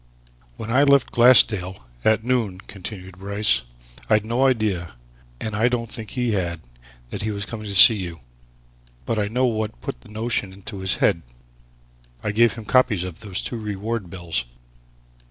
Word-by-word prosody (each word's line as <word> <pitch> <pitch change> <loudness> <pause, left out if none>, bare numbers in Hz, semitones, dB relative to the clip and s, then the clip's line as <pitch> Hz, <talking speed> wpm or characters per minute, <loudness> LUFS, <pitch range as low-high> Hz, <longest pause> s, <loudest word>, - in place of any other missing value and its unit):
"When 115 - -5
I 130 +4 +4
left 140 -2 +4
Glassdale 105 - +4 0.2
at 110 0 +3
noon," 115 -6 0
continued 95 -2 -10
Bryce, 100 -7 +1 0.5
"I'd 110 -1 +3
no 120 +4 +2
idea 105 - -1 0.5
and 110 -1 -4
I 110 +3 +3
don't 115 -2 -2
think 110 -5 -6
he 125 0 -1
had 85 -5 -2 0.5
that - - -4
he 110 - -2
was 100 -1 -3
coming 110 0 -7
to 100 - -4
see 110 +3 +9
you. 85 -5 -6 0.8
But 110 - -1
I 105 - 0
know 125 +5 +1
what 110 - -2
put - - -6
the - - -17
notion 105 -3 -2
into 100 +1 -9
his 95 -1 -1
head. 85 - +2 1.0
I 105 - -1
gave 115 0 +4
him 115 0 -9
copies 120 -6 +3
of 90 -3 -7
those 100 -3 -4
two 120 - -4
reward 105 -1 -4
bills. 85 -7 -3
105 Hz, 170 wpm, -23 LUFS, 95-115 Hz, 1.0 s, see